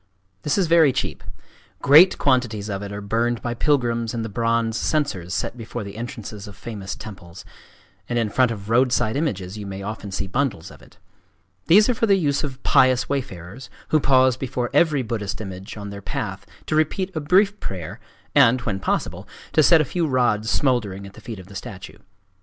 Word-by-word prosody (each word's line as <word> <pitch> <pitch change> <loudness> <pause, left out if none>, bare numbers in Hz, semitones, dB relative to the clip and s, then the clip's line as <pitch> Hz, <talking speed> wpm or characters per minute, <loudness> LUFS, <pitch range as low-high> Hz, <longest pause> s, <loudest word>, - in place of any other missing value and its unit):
This 150 - 0
is 190 - +3
very 165 -3 +5
cheap. - - -3 0.6
Great 155 +7 +7
quantities 120 -6 +1
of 100 -1 -3
it 100 0 -6
are 100 0 -5
burned 115 +3 0
by 120 - -2
pilgrims 120 -4 0
in 115 - -2
the 115 - -4
bronze 115 -1 0
censers 110 - -1
set 105 - -2
before 115 -1 -6
the 100 0 -8
entrances 110 -3 -7
of 100 -2 -11
famous 100 -5 -6
temples; 95 -5 -11 0.6
and 120 - -1
in 115 -3 0
front 130 +2 +3
of 105 -3 -6
roadside 120 -1 +2
images 105 - -2
you 100 - -6
may 100 0 -6
often 105 0 -6
see 95 - -2
bundles 120 - -2
of - - -15
it. - - -19 0.7
These 210 +5 +6
are 250 - +2
for 225 0 0
the 200 - +5
use 145 -6 0
of 135 -3 -6
pious 130 -1 +4
wayfarers, 125 -4 -5 0.2
who 155 - +4
pause 130 -2 +4
before 125 -2 -3
every 155 -6 +3
Buddhist 105 -3 -4
image 95 -1 -7
on 100 -1 -7
their 100 0 -8
path 100 0 -5 0.2
to 155 - -1
repeat 185 +5 0
a - - 0
brief 195 +7 +3
prayer 90 -5 -6 0.3
and, 130 -3 +5
when 105 -5 -2
possible, 95 0 -2 0.3
to 155 - +5
set 165 +1 +6
a - - 0
few 170 +4 -1
rods 120 -5 +1
smouldering 110 -9 0
at 100 - -11
the 110 - -14
feet 115 -1 -7
of 95 - -11
the 100 - -14
statue. 100 -2 -9
115 Hz, 195 wpm, -22 LUFS, 100-140 Hz, 0.7 s, Great